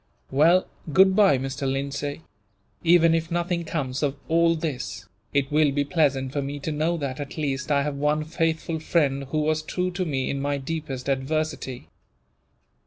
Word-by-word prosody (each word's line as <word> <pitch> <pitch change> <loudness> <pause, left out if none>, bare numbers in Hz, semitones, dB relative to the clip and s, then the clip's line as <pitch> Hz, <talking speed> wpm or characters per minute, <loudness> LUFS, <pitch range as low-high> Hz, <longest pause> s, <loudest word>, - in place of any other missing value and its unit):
"Well, 165 +7 +5 0.3
goodbye, 190 -2 +5
Mr. 135 +1 -2
Lindsay! 140 +2 -3 0.6
Even 165 -1 +5
if 165 0 0
nothing 175 0 -1
comes 135 -5 -3
of 145 -2 0
all 165 +1 +3
this, 125 - -4 0.2
it 140 0 0
will 150 -1 +4
be 145 +1 +1
pleasant 140 -4 +1
for 145 - 0
me 140 +1 -4
to 155 - -3
know 160 +3 0
that, 140 -3 -4
at 145 +1 -6
least, 140 -2 -2
I 140 -1 +3
have 145 -1 -3
one 150 +2 +1
faithful 160 0 -1
friend 140 -4 +1
who 155 +3 -1
was 155 +1 +1
true 180 +3 -2
to 180 +1 -2
me, 135 -6 -1
in 140 - -3
my 145 0 0
deepest 140 -2 -5
adversity." 135 -1 -2
150 Hz, 170 wpm, -25 LUFS, 140-165 Hz, 0.6 s, Well